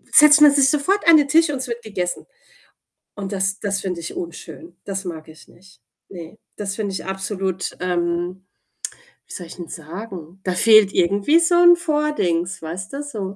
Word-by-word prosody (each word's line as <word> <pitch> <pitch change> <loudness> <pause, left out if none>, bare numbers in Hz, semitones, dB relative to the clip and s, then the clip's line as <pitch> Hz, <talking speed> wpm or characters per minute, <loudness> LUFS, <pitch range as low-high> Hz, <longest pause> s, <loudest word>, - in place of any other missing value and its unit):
setzt 300 -1 +8
man 295 -1 +9
sich 280 -1 +4
sofort 335 +8 0
an 320 - +9
den 290 - +2
Tisch 320 +2 +3
und 285 - -2
es 255 - -5
wird 235 0 -5
gegessen. 190 -5 -4 0.9
Und 200 -1 -6
das 190 +1 -2
das 200 -1 -2
finde 180 -3 -4
ich 165 - -7
unschön. 175 - -9
Das 195 -1 -5
mag 160 -3 -7
ich 155 -1 -15
nicht. 190 +2 -21 0.3
Ne, 175 0 -10 0.2
das 200 -1 -4
finde 205 -2 -4
ich - - -5
absolut 190 -1 -4
ähm, 175 +1 -2 0.8
wie - - -11
soll 175 - -7
ich 165 - -12
'n 170 - -7
sagen? 175 +1 -9
Da 185 - -1
fehlt 215 0 +5
irgendwie 200 - +2
so 340 +1 +1
'n 350 0 +7
Vordings, 295 - -1
weißt 185 +8 -7
du, 285 - -4
so. 205 -9 -6
195 Hz, 185 wpm, -21 LUFS, 180-280 Hz, 0.9 s, man